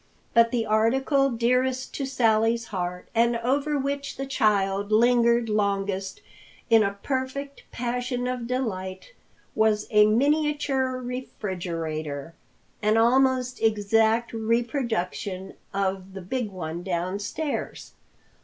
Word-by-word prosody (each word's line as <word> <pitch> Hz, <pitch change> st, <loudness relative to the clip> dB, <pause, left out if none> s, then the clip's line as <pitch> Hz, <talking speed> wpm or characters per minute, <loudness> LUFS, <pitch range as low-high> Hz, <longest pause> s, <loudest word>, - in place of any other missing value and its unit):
But 230 Hz, 0 st, +5 dB
the 230 Hz, -1 st, 0 dB
article 265 Hz, +6 st, +2 dB
dearest 250 Hz, +2 st, 0 dB
to 275 Hz, -, -3 dB
Sally's 230 Hz, -2 st, +2 dB
heart, 180 Hz, -1 st, -3 dB
and 235 Hz, +1 st, +3 dB
over 280 Hz, +5 st, 0 dB
which 280 Hz, +1 st, -3 dB
the 270 Hz, -, -3 dB
child 205 Hz, -6 st, +1 dB
lingered 235 Hz, +1 st, +4 dB
longest 200 Hz, -, -1 dB, 0.5 s
in 225 Hz, -1 st, +7 dB
a 200 Hz, -1 st, 0 dB
perfect 275 Hz, +1 st, -3 dB
passion 245 Hz, +1 st, -2 dB
of 250 Hz, -2 st, -3 dB
delight 215 Hz, -, -4 dB, 0.4 s
was 215 Hz, -1 st, +2 dB
a 210 Hz, -1 st, +6 dB
miniature 280 Hz, +1 st, +1 dB
refrigerator, 170 Hz, -, -5 dB, 0.5 s
an 215 Hz, +1 st, +3 dB
almost 255 Hz, +2 st, +3 dB
exact 225 Hz, +2 st, +2 dB
reproduction 225 Hz, -5 st, -2 dB, 0.2 s
of 195 Hz, -1 st, -2 dB
the 195 Hz, -, -6 dB
big 225 Hz, +5 st, -3 dB
one 170 Hz, -3 st, -5 dB
downstairs. 195 Hz, -, -3 dB
230 Hz, 105 wpm, -25 LUFS, 200-255 Hz, 0.5 s, in